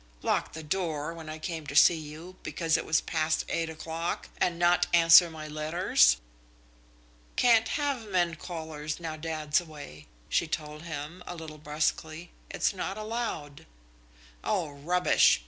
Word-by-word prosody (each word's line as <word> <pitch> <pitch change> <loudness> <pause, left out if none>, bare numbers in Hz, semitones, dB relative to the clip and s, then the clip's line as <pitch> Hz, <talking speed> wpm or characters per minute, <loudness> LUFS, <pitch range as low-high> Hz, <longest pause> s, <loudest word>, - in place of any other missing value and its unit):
Lock - - 0
the 160 - -7
door 160 -1 -2
when 165 -2 -9
I 155 - -5
came 160 -2 -5
to 145 - -6
see 145 - +8
you, 160 +3 -8
because 165 -2 0
it - - -1
was 160 - +3
past 160 -1 0
eight 165 -1 -1
o'clock, 160 +1 -4
and 170 -1 +1
not 175 +1 +3
answer 170 +1 +8
my 155 -1 -8
letters?" 155 - +3 1.2
"Can't 230 -2 +5
have 280 -6 -1
men 175 -3 +2
callers 160 -2 -6
now 165 -2 -4
dad's 155 -1 0
away," 145 - -11 0.2
she 170 - +1
told 150 -1 -4
him, 160 +1 -6
a 175 - -5
little 155 -2 -9
brusquely. 155 +2 -2 0.2
"It's - - 0
not 195 +1 -4
allowed." 215 -10 -4 0.8
"Oh, 145 - -1
rubbish!" 170 - +3
160 Hz, 145 wpm, -29 LUFS, 155-175 Hz, 1.2 s, see